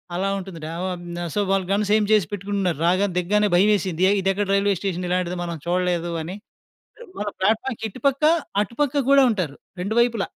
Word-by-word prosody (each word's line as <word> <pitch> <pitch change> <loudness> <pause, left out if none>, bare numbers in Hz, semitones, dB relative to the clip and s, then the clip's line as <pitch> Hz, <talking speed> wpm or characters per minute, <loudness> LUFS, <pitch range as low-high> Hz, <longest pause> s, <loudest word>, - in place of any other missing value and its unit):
అలా 195 +2 0
ఉంటుంది. 185 -3 -8
న - - -5 0.2
ఓ - - -2 0.3
న 175 - -3
సో 205 - +2
వాళ్ళు 195 -2 +1
గన్స్ 205 0 0
ఏయిం 210 -2 +2
చేసి 205 -7 +3
పెట్టుకుంటున్నారు. 195 -4 -2
రాగానే 185 +1 +2
దిగగానే 210 +3 +2
భయమేసింది 185 -2 +2
ఏ - - +4
ఇదెక్కడ 195 +2 0
రైల్వే 200 0 +2
స్టేషన్ 180 -2 -2
ఇలాంటిది 180 0 -1
మనం 170 -1 -4
చూడలేదు 175 -1 0
అని. 185 +5 -6 0.8
మన 210 - -3
ప్లాట్ఫార్మ్‌కి 225 +4 0
ఇటుపక్క, 275 +5 0 0.4
అటుపక్క 285 +6 -1
కూడా 275 -1 +7
ఉంటారు 175 -9 -3 0.2
2 215 +5 -2
వైపులా. 235 -4 0
195 Hz, 175 wpm, -23 LUFS, 180-210 Hz, 0.8 s, కూడా